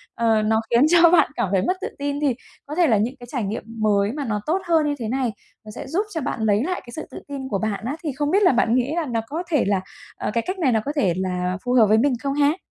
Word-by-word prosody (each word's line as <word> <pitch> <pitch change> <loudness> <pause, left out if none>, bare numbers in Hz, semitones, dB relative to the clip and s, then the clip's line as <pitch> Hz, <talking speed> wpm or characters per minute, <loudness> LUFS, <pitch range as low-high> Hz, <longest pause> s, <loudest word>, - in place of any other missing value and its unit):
Ờ, 225 -2 +2
nó 220 +1 +2
khiến 235 +1 +4
cho 340 0 +6
bạn 345 -3 +4
cảm 190 - -1
thấy 190 - +3
mất 370 - +1
tự 430 - -3
tin 285 0 -2
thì, 275 -5 +1 0.3
có 295 - -6
thể 345 -2 +4
là 225 - +4
những 230 +6 -1
cái 245 - -11
trải 250 -6 -2
nghiệm 205 +3 -3 0.2
mới 205 -1 +2
mà 285 +1 -4
nó 210 -3 -2
tốt 365 +5 0
hơn 320 -3 +3
như 290 - 0
thế 225 - -3
này, 250 0 -1 0.3
nó 215 - -9
sẽ - - -7
giúp 375 +9 0
cho 320 - -2
bạn 260 -4 -3
lấy 210 +1 +2
lại 365 +4 -2
cái 240 - -11
sự 315 - -6
tự - - -8
tin 275 -2 -6
của 200 - -1
bạn 220 0 -3
á. 270 - -2
Thì 300 - -1
không 290 +2 -1
biết 400 +2 +3
là 360 - +6
bạn 235 -1 +2
nghĩ 255 +4 0
là 340 -2 -1
nó 235 -4 -1
có 320 +7 -4
thể 300 -5 +2
là, 195 -2 +1 0.4
ờ, - - -3
cái 230 - 0
cách 370 +1 -3
này 285 -7 +2
nó 225 - +2
có 290 - -1
thể 200 - +2
là 180 -1 -2
phù 245 - 0
hợp 230 -4 +6
với 215 - +4
mình 265 +4 +3
không 275 - -1
ha? 290 +3 +2
255 Hz, 305 wpm, -22 LUFS, 220-300 Hz, 0.4 s, cho